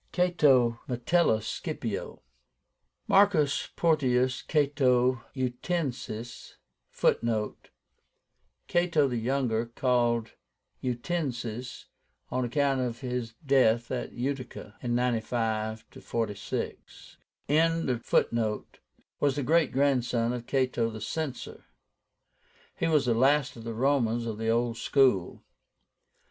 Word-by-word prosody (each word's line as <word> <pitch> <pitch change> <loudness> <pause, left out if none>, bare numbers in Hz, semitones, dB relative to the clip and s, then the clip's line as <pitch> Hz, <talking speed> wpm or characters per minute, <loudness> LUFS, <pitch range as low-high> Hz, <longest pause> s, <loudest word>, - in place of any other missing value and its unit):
CATO. 140 -10 +3
METELLUS 125 -2 +1
SCIPIO. - - -4 0.8
MARCUS 180 -7 +3
PORTIUS 130 -6 +2
CATO 130 -5 +2
UTICENSIS 125 -3 -4 0.3
(Footnote: 110 -2 -1 1.0
Cato 170 -4 +2
the 125 -2 -2
Younger, 120 -2 0
called 120 -2 +1 0.5
UTICENSIS 125 -3 -3 0.5
on 130 0 0
account 135 +2 +1
of 120 -2 -3
his 125 -3 -4
death 120 -4 +3
at 125 - -3
Utica.) 125 -4 -5
(95 115 -2 -1
46) 105 -4 -5 0.3
was 135 -4 0
the 145 - -2
great 160 0 +3
grandson 125 -4 +1
of 120 -1 -6
Cato 130 -4 +1
the 110 -1 -7
Censor. 140 +4 -5 1.1
He 165 - -1
was 150 -4 +3
the 120 - +2
last 135 +3 +3
of 115 - -10
the 115 -1 -5
Romans 120 -2 +1
of 110 -2 -4
the 110 0 -1
old 115 0 +1
school. 125 -9 +2
125 Hz, 95 wpm, -28 LUFS, 115-140 Hz, 1.1 s, CATO